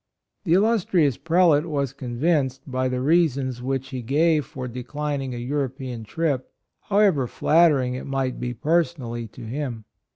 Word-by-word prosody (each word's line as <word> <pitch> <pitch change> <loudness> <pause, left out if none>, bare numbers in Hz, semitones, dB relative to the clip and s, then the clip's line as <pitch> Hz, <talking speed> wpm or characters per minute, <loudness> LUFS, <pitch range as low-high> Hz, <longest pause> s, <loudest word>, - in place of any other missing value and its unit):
The 165 - +2
illustrious 185 - +3
Prelate 165 -1 +3
was 140 -4 -1
convinced 135 +1 -1
by 130 -1 -1
the 125 0 -2
reasons 135 -5 +1
which 135 +1 -2
he 130 -2 -5
gave 150 +3 +2
for 135 -5 -6
declining 135 +2 -4
a - - -5
European 130 -2 -3
trip, 145 +1 -2 0.3
however 195 -11 +2
flattering 150 -4 +3
it 130 - -6
might 135 -2 -2
be 125 0 -3
per 165 +8 +3
sonally 120 -9 -7
to - - -10
him. 120 -2 -4
135 Hz, 150 wpm, -24 LUFS, 125-160 Hz, 0.3 s, illustrious